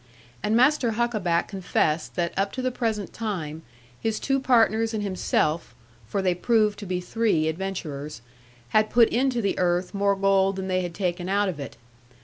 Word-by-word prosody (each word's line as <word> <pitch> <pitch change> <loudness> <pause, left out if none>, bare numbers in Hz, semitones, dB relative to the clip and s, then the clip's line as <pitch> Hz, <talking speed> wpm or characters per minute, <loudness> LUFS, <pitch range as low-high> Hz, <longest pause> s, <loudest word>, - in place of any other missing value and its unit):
And 215 - +1
Master 255 -1 +3
Huckaback 215 -7 0
confessed 175 -5 -1
that 170 -1 -1
up 195 +1 0
to 260 - -4
the 255 - 0
present 220 -5 -2
time 165 -8 -4 0.4
his 220 -1 -1
two 270 0 +1
partners 225 -3 +3
and 210 - -2
himself 175 -4 -1 0.3
(for 195 - -2
they 185 -1 +3
proved 210 +2 +1
to 205 - -7
be 180 0 -1
three 180 -3 +1
adventurers) 155 -7 -4 0.5
had 215 0 +3
put 235 -1 +5
into 245 -1 +1
the 200 - 0
earth 180 +1 +1
more 200 0 +2
gold 195 0 +2
than 190 0 -4
they 185 0 +1
had 175 -2 -5
taken 180 -1 -2
out 200 0 +2
of 165 -5 -5
it. 140 - -7
195 Hz, 175 wpm, -25 LUFS, 175-225 Hz, 0.5 s, put